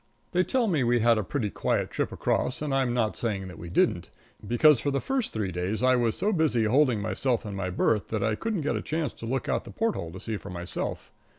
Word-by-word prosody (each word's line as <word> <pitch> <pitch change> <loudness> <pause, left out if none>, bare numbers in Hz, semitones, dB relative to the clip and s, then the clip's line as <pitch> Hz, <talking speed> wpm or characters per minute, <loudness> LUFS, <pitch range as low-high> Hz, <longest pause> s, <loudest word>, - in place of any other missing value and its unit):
They 180 +1 +3
tell 250 +4 +1
me 165 - +1
we 120 0 +2
had 115 -1 +4
a - - -1
pretty 105 -1 -2
quiet - - -1
trip - - -1
across, 130 - -1
and 145 -2 -1
I'm 135 -2 +2
not 115 -3 0
saying 100 -5 -2
that 90 - -11
we 85 - -7
didn't, - - +1 0.4
because 130 +4 +5
for 145 - 0
the 140 0 0
first 265 - -1
three 105 -4 -2
days 90 +7 -2
I 130 0 +5
was 120 -3 +1
so 210 - +1
busy 155 - +2
holding 125 0 +3
myself 120 +3 -1
in 105 - -5
my 95 -1 -2
berth 100 +3 +1
that 110 -3 -2
I 110 - +1
couldn't 210 - -2
get 145 - 0
a - - -2
chance 155 -4 -2
to 115 - -8
look 130 +3 -2
out - - 0
the - - -11
porthole 220 - -2
to 95 - -7
see 110 +2 -4
for 100 - -10
myself. 90 -1 -5
120 Hz, 250 wpm, -27 LUFS, 105-145 Hz, 0.4 s, because